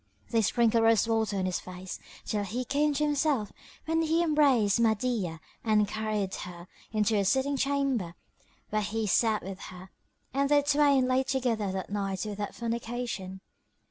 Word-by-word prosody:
They 230 Hz, -2 st, +3 dB
sprinkled 230 Hz, +1 st, +3 dB
rose 225 Hz, 0 st, +4 dB
water 220 Hz, -3 st, 0 dB
on 190 Hz, -, 0 dB
his 185 Hz, -1 st, -1 dB
face, 185 Hz, 0 st, -8 dB, 0.3 s
till 210 Hz, -1 st, -1 dB
he 240 Hz, +6 st, -3 dB
came 290 Hz, +4 st, +1 dB
to 300 Hz, -, +1 dB
himself, 290 Hz, -7 st, +1 dB, 0.3 s
when 325 Hz, +1 st, +1 dB
he 325 Hz, +1 st, +2 dB
embraced 275 Hz, -, +3 dB
Mahdiyah 220 Hz, -6 st, 0 dB, 0.2 s
and 215 Hz, -2 st, +3 dB
carried 215 Hz, -2 st, -2 dB
her 175 Hz, 0 st, -7 dB, 0.2 s
into 215 Hz, 0 st, +1 dB
a -, -, +2 dB
sitting 265 Hz, +7 st, +1 dB
chamber, 270 Hz, -10 st, 0 dB, 0.6 s
where 215 Hz, 0 st, +1 dB
he 215 Hz, +2 st, -2 dB
sat 215 Hz, +1 st, +2 dB
with 190 Hz, 0 st, -7 dB
her; 185 Hz, +1 st, -11 dB, 0.4 s
and 275 Hz, +1 st, +1 dB
they 290 Hz, -1 st, +4 dB
twain 285 Hz, -2 st, +4 dB
lay 255 Hz, +1 st, +3 dB
together 245 Hz, -7 st, -1 dB
that 190 Hz, 0 st, -4 dB
night 195 Hz, -1 st, -2 dB
without 205 Hz, -1 st, -5 dB
fornication. 230 Hz, -5 st, -4 dB
225 Hz, 160 wpm, -29 LUFS, 200-265 Hz, 0.6 s, rose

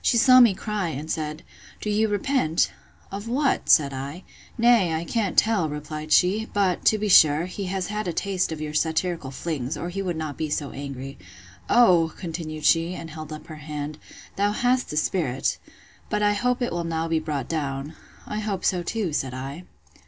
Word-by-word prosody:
She 235 Hz, -, +3 dB
saw 255 Hz, +2 st, +7 dB
me 235 Hz, -6 st, +6 dB
cry, 210 Hz, -2 st, -2 dB
and 155 Hz, +1 st, -5 dB
said, 155 Hz, -1 st, -3 dB, 0.4 s
Do -, -, -6 dB
you 215 Hz, +1 st, +2 dB
repent?—Of 185 Hz, -, -2 dB
what? 270 Hz, +3 st, 0 dB
said 140 Hz, -3 st, +5 dB
I.—Nay, 180 Hz, -, 0 dB
I 160 Hz, -, -2 dB
can't 205 Hz, +2 st, -1 dB
tell, 210 Hz, -8 st, +3 dB
replied 150 Hz, +1 st, -6 dB
she; 205 Hz, +5 st, +3 dB
but, 195 Hz, -3 st, +1 dB
to 215 Hz, -, +5 dB
be 210 Hz, 0 st, -2 dB
sure, 155 Hz, -4 st, +6 dB
he 190 Hz, +2 st, -5 dB
has 185 Hz, 0 st, -2 dB
had 210 Hz, 0 st, -3 dB
a -, -, 0 dB
taste 185 Hz, 0 st, -1 dB
of 160 Hz, -, -4 dB
your 150 Hz, -1 st, -5 dB
satirical 160 Hz, -1 st, 0 dB
flings, 145 Hz, 0 st, -4 dB
or 175 Hz, -, -4 dB
he 195 Hz, +2 st, -4 dB
would 180 Hz, -4 st, -2 dB
not 155 Hz, -3 st, -4 dB
be 155 Hz, -1 st, -2 dB
so 145 Hz, -1 st, -2 dB
angry. 135 Hz, -1 st, -7 dB, 0.5 s
O! 175 Hz, -9 st, +5 dB
continued 160 Hz, -4 st, -5 dB
she, 165 Hz, +3 st, +3 dB
and 165 Hz, -2 st, -8 dB
held 155 Hz, 0 st, -8 dB
up 155 Hz, -, -8 dB
her 155 Hz, -, -9 dB
hand, 150 Hz, 0 st, -6 dB, 0.4 s
thou 205 Hz, +1 st, +2 dB
hast 245 Hz, +3 st, +1 dB
a 150 Hz, -, -3 dB
spirit!—But 155 Hz, +6 st, -2 dB
I 205 Hz, 0 st, +4 dB
hope 250 Hz, +4 st, 0 dB
it 240 Hz, -, -1 dB
will 175 Hz, 0 st, -2 dB
now 165 Hz, 0 st, -2 dB
be 165 Hz, -1 st, +1 dB
brought 150 Hz, -4 st, -3 dB
down.—I 150 Hz, +6 st, -5 dB
hope 210 Hz, -3 st, -3 dB
so 180 Hz, -2 st, +2 dB
too, 180 Hz, -1 st, -2 dB
said 130 Hz, -3 st, -2 dB
I. 140 Hz, +7 st, -7 dB
165 Hz, 185 wpm, -24 LUFS, 150-205 Hz, 0.5 s, saw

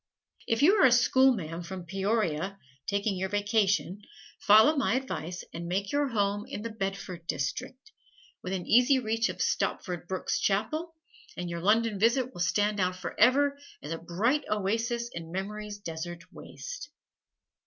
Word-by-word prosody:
If 230 Hz, +3 st, +1 dB
you 385 Hz, +8 st, +6 dB
are -, -, +8 dB
a -, -, +3 dB
schoolma'am 240 Hz, -9 st, +3 dB
from 185 Hz, 0 st, -7 dB
Peoria, 195 Hz, -1 st, -1 dB, 0.3 s
taking 200 Hz, 0 st, 0 dB
your 190 Hz, +1 st, -2 dB
vacation, 205 Hz, -1 st, +1 dB, 0.4 s
follow 220 Hz, +9 st, +6 dB
my 270 Hz, -4 st, +1 dB
advice 180 Hz, -10 st, -4 dB
and 170 Hz, +1 st, -5 dB
make 195 Hz, +3 st, -2 dB
your 290 Hz, 0 st, +1 dB
home 205 Hz, -4 st, 0 dB
in 210 Hz, -, -6 dB
the 230 Hz, -, -4 dB
"Bedford 195 Hz, -4 st, -5 dB
District," 255 Hz, -, -4 dB, 0.5 s
within 185 Hz, -1 st, -4 dB
easy 250 Hz, +4 st, +5 dB
reach 230 Hz, -1 st, 0 dB
of -, -, -6 dB
Stopford 175 Hz, -3 st, -2 dB
Brooke's 185 Hz, 0 st, -2 dB
chapel, 310 Hz, -, -1 dB, 0.4 s
and 175 Hz, -1 st, -4 dB
your 170 Hz, 0 st, -4 dB
London 215 Hz, +2 st, +2 dB
visit 245 Hz, +4 st, +2 dB
will 175 Hz, -, -6 dB
stand 205 Hz, +3 st, +1 dB
out 185 Hz, -1 st, +1 dB
forever 280 Hz, +9 st, +2 dB, 0.2 s
as 150 Hz, -, -6 dB
a 165 Hz, -, -3 dB
bright 215 Hz, -, 0 dB
oasis 225 Hz, +4 st, -1 dB
in 165 Hz, -1 st, -7 dB
memory's 205 Hz, +3 st, -5 dB
desert 170 Hz, -2 st, -6 dB
waste. -, -, -8 dB
205 Hz, 150 wpm, -29 LUFS, 180-235 Hz, 0.5 s, are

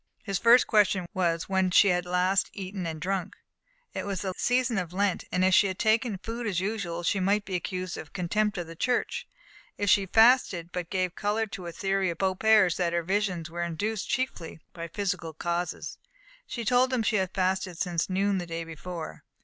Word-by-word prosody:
His 195 Hz, -3 st, -2 dB
first 235 Hz, +2 st, +6 dB
question 200 Hz, -4 st, +3 dB
was, 170 Hz, -4 st, 0 dB
when 190 Hz, -1 st, +1 dB
she 195 Hz, +2 st, +6 dB
had 180 Hz, -1 st, 0 dB
last 185 Hz, +2 st, +2 dB
eaten 190 Hz, -2 st, -5 dB
and 160 Hz, -1 st, -5 dB
drunk. 185 Hz, +2 st, -2 dB, 0.6 s
It -, -, -3 dB
was 200 Hz, -2 st, -3 dB
the 190 Hz, -1 st, -2 dB
season 245 Hz, -3 st, +1 dB
of 180 Hz, -1 st, -5 dB
Lent; 195 Hz, -1 st, 0 dB
if 185 Hz, +1 st, +2 dB
she 200 Hz, +2 st, +6 dB
had 185 Hz, -1 st, -4 dB
taken 220 Hz, -1 st, +1 dB
food 230 Hz, +4 st, -5 dB
as 185 Hz, -4 st, 0 dB
usual, 185 Hz, -4 st, -3 dB
she 195 Hz, +3 st, +1 dB
might 200 Hz, +2 st, +1 dB
be 190 Hz, -, -7 dB
accused 185 Hz, 0 st, -3 dB
of 155 Hz, -, -10 dB
contempt 200 Hz, +3 st, 0 dB
for 175 Hz, -, -2 dB
the 165 Hz, 0 st, -11 dB
Church; 245 Hz, +8 st, -1 dB, 0.5 s
if 205 Hz, -1 st, +2 dB
she 200 Hz, -, +5 dB
had 190 Hz, -, -6 dB
fasted, 220 Hz, -7 st, +4 dB
she 180 Hz, -, -2 dB
gave 185 Hz, 0 st, -1 dB
colour 210 Hz, +3 st, 0 dB
to 195 Hz, -4 st, -8 dB
a -, -, -5 dB
theory 195 Hz, 0 st, 0 dB
of 170 Hz, -, -4 dB
Beaupère's, 190 Hz, 0 st, +3 dB
that 175 Hz, -2 st, 0 dB
her 170 Hz, 0 st, 0 dB
visions 185 Hz, -3 st, -1 dB
were 170 Hz, +1 st, -4 dB
induced 195 Hz, +5 st, -2 dB
chiefly 240 Hz, -11 st, -3 dB
by 170 Hz, -1 st, -6 dB
physical 180 Hz, -3 st, -3 dB
causes. 175 Hz, +2 st, -3 dB, 0.5 s
She 235 Hz, -2 st, -5 dB
told 250 Hz, +2 st, +3 dB
him 250 Hz, -3 st, +1 dB
she 215 Hz, -, +2 dB
had 190 Hz, -2 st, -2 dB
fasted 185 Hz, -2 st, 0 dB
since 175 Hz, -1 st, -1 dB
noon 195 Hz, +1 st, +1 dB
the 175 Hz, -, -5 dB
day 165 Hz, 0 st, -4 dB
before. 165 Hz, +1 st, -7 dB
190 Hz, 200 wpm, -27 LUFS, 175-205 Hz, 0.6 s, first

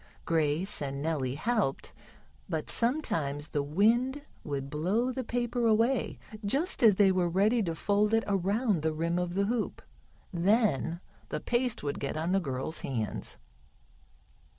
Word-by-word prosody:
Grace 160 Hz, +4 st, 0 dB
and 140 Hz, -1 st, -3 dB
Nellie 140 Hz, -4 st, -1 dB
helped, 205 Hz, -, -1 dB, 0.6 s
but 160 Hz, -3 st, -2 dB
sometimes 160 Hz, -, 0 dB
the 145 Hz, -, 0 dB
wind 230 Hz, -, +2 dB, 0.2 s
would 140 Hz, -2 st, -3 dB
blow 190 Hz, -, 0 dB
the 260 Hz, 0 st, -3 dB
paper 240 Hz, 0 st, 0 dB
away 230 Hz, +4 st, +2 dB, 0.3 s
just 280 Hz, -, 0 dB
as 220 Hz, -5 st, +7 dB
they 195 Hz, -1 st, +5 dB
were 180 Hz, -2 st, +1 dB
ready 210 Hz, +7 st, +3 dB
to 170 Hz, -5 st, -2 dB
fold 205 Hz, +4 st, +1 dB
it 225 Hz, 0 st, +3 dB
around 200 Hz, 0 st, +1 dB
the 160 Hz, 0 st, 0 dB
rim 170 Hz, +3 st, 0 dB
of 180 Hz, 0 st, -2 dB
the 200 Hz, +1 st, +2 dB
hoop. 230 Hz, +1 st, -1 dB, 0.5 s
Then 175 Hz, -, +2 dB, 0.3 s
the -, -, -2 dB
paste 245 Hz, -, -1 dB
would 145 Hz, -1 st, -2 dB
get 140 Hz, +2 st, -3 dB
on 165 Hz, +3 st, -1 dB
the 195 Hz, -, +3 dB
girls' 135 Hz, -1 st, -3 dB
hands. 110 Hz, -, -3 dB
185 Hz, 150 wpm, -30 LUFS, 155-230 Hz, 0.6 s, as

